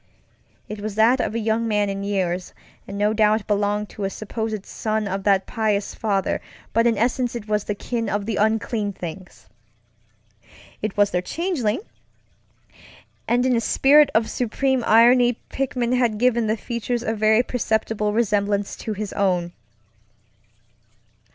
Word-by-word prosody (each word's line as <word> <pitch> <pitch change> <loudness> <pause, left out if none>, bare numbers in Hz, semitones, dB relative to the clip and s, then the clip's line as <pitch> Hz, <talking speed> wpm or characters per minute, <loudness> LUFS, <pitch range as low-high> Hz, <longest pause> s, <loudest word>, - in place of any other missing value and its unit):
It 210 -1 -7
was 210 -1 -4
that 230 +4 +4
of - - -2
a - - 0
young 225 +1 0
man 210 -2 +1
in 195 0 -3
years, 185 -3 -2 0.3
and 200 - -6
no 210 +1 +2
doubt 215 -1 +2
belonged 205 0 0
to 205 - -7
a 195 - 0
supposed 215 0 -4
son 215 -1 -2
of 195 0 -3
that 195 -2 +3
pious 215 -3 -1
father, 200 -4 -1 0.3
but 230 +1 +3
in 230 -3 +2
essence 245 +2 0
it 225 -3 -6
was 210 -1 0
the 205 - -2
kin 230 +1 -3
of 205 0 -2
the 220 -1 -2
unclean 215 -1 0
things. 180 0 -9 1.4
It 215 -1 -3
was 205 0 +3
their 180 - 0
changelingŌĆöand 320 - -2 1.4
in 245 +1 +2
a 230 - +1
spirit 285 +5 +5
of 220 0 +3
supreme 255 +2 0
irony 240 +2 +5
Pickman 255 -2 -1
had 240 -4 +1
given 235 -1 +2
the 220 +1 0
features 235 +1 -3
a 220 - -1
very 220 +2 +3
perceptible 220 -3 -1
resemblance 205 -2 0
to 220 - -4
his 210 0 -5
own. 180 -3 0
215 Hz, 150 wpm, -22 LUFS, 205-235 Hz, 1.4 s, spirit